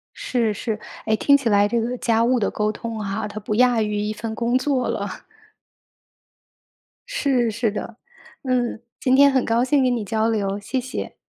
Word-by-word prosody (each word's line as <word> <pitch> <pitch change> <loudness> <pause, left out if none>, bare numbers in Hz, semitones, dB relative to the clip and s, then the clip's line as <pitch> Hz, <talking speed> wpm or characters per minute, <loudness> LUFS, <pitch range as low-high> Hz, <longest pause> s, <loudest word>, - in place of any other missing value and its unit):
是 230 -4 0
是。 215 +1 -3 0.3
哎， 220 - +2
听 280 +5 +4
起 255 -5 -1
来 205 0 +4
这 235 +2 0
个 245 +2 -2
家 230 -1 +2
务 250 +1 +2
的 210 - +1
沟 210 0 0
通 225 0 -6
哈， 205 +2 -3
它 210 0 -7
不 210 0 -3
亚 245 -1 +4
于 210 -1 -1
一 210 +1 -2
份 220 +1 -5
工 240 +2 +1
作 260 -1 0
了。 - - -2 2.0
是， 275 - +1
是 225 0 0
的。 215 +2 -6 0.5
嗯， 245 -3 -1 0.2
今 255 0 +3
天 280 +1 +7
很 260 -2 +2
高 230 +1 +2
兴 270 +1 +2
跟 250 -1 +2
你 230 - -3
交 220 +2 0
流， 205 -2 -1
谢 250 +6 -2
谢。 255 +1 -5
230 Hz, 200 characters per minute, -22 LUFS, 215-250 Hz, 2.0 s, 天